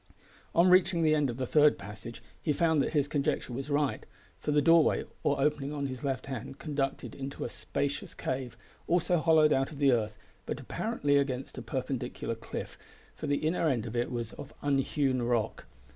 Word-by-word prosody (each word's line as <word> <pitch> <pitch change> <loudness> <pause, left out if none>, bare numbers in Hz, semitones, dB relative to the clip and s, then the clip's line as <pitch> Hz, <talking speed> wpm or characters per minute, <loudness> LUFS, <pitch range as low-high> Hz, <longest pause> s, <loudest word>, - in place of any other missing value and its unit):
On 170 +2 +6
reaching 180 -2 +5
the 155 -1 +4
end 150 -3 +2
of 120 - -4
the 130 - -1
third 150 +3 +5
passage 105 +3 -9 0.2
he 150 - +1
found 160 -1 +3
that - - -1
his 145 -2 +2
conjecture 140 -3 -1
was 135 +4 -4
right, 145 -6 0 0.4
for - - -4
the 150 - +4
doorway 165 +1 +5 0.2
or 140 - +1
opening 145 0 +1
on 145 -1 -2
his 130 -1 -5
left 135 -2 -2
hand 135 0 -6
conducted 140 -3 -2
into 135 0 -5
a - - -3
spacious 140 0 -3
cave, 130 -3 -3 0.3
also 175 0 +2
hollowed 155 -2 +5
out 135 0 +1
of 150 - -9
the 140 -2 +4
earth, 110 -3 0 0.3
but - - -3
apparently 145 - 0
against 135 -2 -2
a - - -6
perpendicular 125 -1 -3
cliff, 115 - -7 0.3
for - - -6
the 145 +2 0
inner 165 +1 +1
end 120 -5 0
of 115 0 -6
it 120 0 0
was 120 -2 -3
of 140 - -10
unhewn 135 -2 +1
rock. 120 - -1
140 Hz, 190 wpm, -30 LUFS, 125-150 Hz, 0.4 s, On